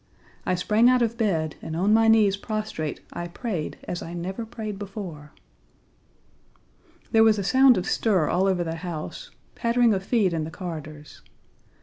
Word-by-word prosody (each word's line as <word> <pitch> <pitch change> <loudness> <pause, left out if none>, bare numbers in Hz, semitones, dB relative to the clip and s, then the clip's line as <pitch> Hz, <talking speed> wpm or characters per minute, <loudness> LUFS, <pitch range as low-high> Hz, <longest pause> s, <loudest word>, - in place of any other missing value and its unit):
I 185 - +2
sprang 215 +6 +3
out 255 -1 +4
of 230 0 -1
bed, 170 -9 -1
and 160 - -5
on 195 +5 +2
my 225 0 +5
knees 215 -3 +5
prostrate 210 -7 -4
I 175 0 -4
prayed 175 -3 -4
as 175 - -5
I 170 +1 -7
never 190 +6 -5
prayed 215 -3 -6
before. 185 -7 -7 1.8
There 225 -1 +6
was 220 -1 +5
a 200 - -2
sound 260 +4 +5
of 180 - -2
stir 190 -9 +1
all 185 +2 +2
over 185 -2 +1
the 165 0 -4
house, 165 -3 -6 0.2
pattering 235 -1 +2
of 190 -1 -2
feet 200 -4 +1
in 160 -1 -1
the 155 - -5
corridors. 155 -4 -8
195 Hz, 165 wpm, -25 LUFS, 170-220 Hz, 1.8 s, There